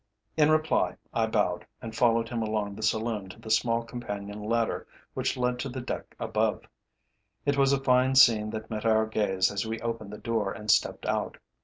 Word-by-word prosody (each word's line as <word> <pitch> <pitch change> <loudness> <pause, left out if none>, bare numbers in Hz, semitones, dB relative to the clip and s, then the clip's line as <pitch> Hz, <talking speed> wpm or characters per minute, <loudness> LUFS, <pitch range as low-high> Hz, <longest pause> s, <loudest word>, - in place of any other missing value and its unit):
In 155 -1 +4
reply, 155 0 +2 0.2
I 115 -1 +1
bowed 105 -6 0 0.2
and 115 -1 -8
followed 115 -1 +3
him 120 -2 -2
along 105 -2 -1
the 105 - -9
saloon 110 -2 -1
to 90 - -11
the 110 - -7
small 115 +1 +2
companion 105 -3 -6
ladder 115 +2 -1 0.3
which - - -1
led 125 0 0
to 135 - -3
the 130 +1 -5
deck 125 - -6
above. - - 0 0.8
It 145 -1 +2
was 135 -1 +4
a 140 - +3
fine 130 0 +3
scene 110 -5 +6
that 110 +1 -6
met 110 -1 -3
our 110 -1 +3
gaze 100 -4 +1
as 100 +1 -2
we 110 0 -3
opened 115 -3 -4
the 105 - -7
door 110 -4 -1
and 105 0 0
stepped - - +1
out. - - -1
115 Hz, 195 wpm, -28 LUFS, 105-120 Hz, 0.8 s, scene